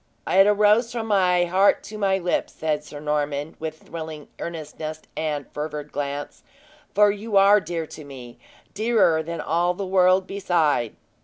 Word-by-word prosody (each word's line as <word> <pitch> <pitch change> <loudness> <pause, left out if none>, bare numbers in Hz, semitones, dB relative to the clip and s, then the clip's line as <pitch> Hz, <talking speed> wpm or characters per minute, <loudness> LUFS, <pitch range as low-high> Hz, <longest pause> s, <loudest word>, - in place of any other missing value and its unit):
"It 195 +2 +5
arose 210 +3 +4
from 235 -2 -3
my 180 -4 +3
heart 190 +3 +3
to 215 - -8
my 195 -2 +2
lips," 180 -1 -1
said 155 -1 -2
Sir 150 -1 -10
Norman, 150 0 -2
with 155 0 -6
thrilling 160 -2 -8
earnestness 155 -1 -6
and 150 -3 -2
fervid 150 0 -5
glance; 145 0 -5 0.5
"for 205 0 +6
you 205 0 -2
are 200 +2 +7
dear 165 -1 -4
to 155 0 -11
me 130 -4 -11 0.3
dearer 215 -7 +2
than 170 +1 -5
all 175 +2 0
the 195 - -4
world 185 0 +3
beside!" 170 - 0
170 Hz, 155 wpm, -23 LUFS, 150-195 Hz, 0.5 s, are